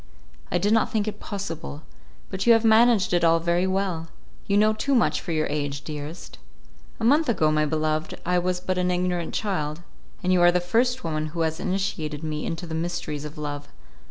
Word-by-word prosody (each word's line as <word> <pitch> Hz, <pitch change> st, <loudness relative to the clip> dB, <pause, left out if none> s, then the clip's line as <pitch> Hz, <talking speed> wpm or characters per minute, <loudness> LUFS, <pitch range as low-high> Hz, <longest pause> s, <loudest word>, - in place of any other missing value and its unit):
"I -, -, +2 dB
did 205 Hz, +5 st, +2 dB
not 225 Hz, -, +2 dB
think 215 Hz, -1 st, 0 dB
it 210 Hz, -1 st, -4 dB
possible. 165 Hz, -7 st, -6 dB, 0.5 s
But 195 Hz, +3 st, -3 dB
you 235 Hz, -, +9 dB
have 225 Hz, 0 st, +3 dB
managed 220 Hz, -3 st, +5 dB
it 175 Hz, -1 st, +2 dB
all 165 Hz, 0 st, +5 dB
very 170 Hz, +2 st, +1 dB
well. 185 Hz, -4 st, -1 dB, 0.4 s
You 200 Hz, -, +2 dB
know 215 Hz, +1 st, +4 dB
too 275 Hz, +6 st, 0 dB
much 235 Hz, -, +2 dB
for 175 Hz, -, -5 dB
your 155 Hz, -1 st, +1 dB
age, 145 Hz, -1 st, -3 dB
dearest." 150 Hz, +2 st, -7 dB, 0.6 s
"A -, -, -5 dB
month 290 Hz, +6 st, +4 dB
ago, 160 Hz, -9 st, +2 dB
my 155 Hz, 0 st, +2 dB
beloved, 155 Hz, 0 st, -1 dB
I 180 Hz, +1 st, +2 dB
was 180 Hz, 0 st, -1 dB
but 185 Hz, 0 st, -2 dB
an 180 Hz, 0 st, +1 dB
ignorant 180 Hz, -1 st, -1 dB
child, 165 Hz, -6 st, -2 dB, 0.4 s
and 185 Hz, +1 st, +2 dB
you 180 Hz, -, +3 dB
are 175 Hz, 0 st, +7 dB
the 180 Hz, -, +2 dB
first 240 Hz, +8 st, +1 dB
woman 155 Hz, -1 st, -2 dB
who 165 Hz, +2 st, -4 dB
has 160 Hz, +1 st, -1 dB
initiated 165 Hz, -6 st, -2 dB
me 155 Hz, -1 st, -3 dB
into 165 Hz, +1 st, -4 dB
the 165 Hz, -, -6 dB
mysteries 160 Hz, -3 st, -3 dB
of 150 Hz, 0 st, -8 dB
love. 145 Hz, -1 st, -5 dB
175 Hz, 205 wpm, -25 LUFS, 155-200 Hz, 0.6 s, you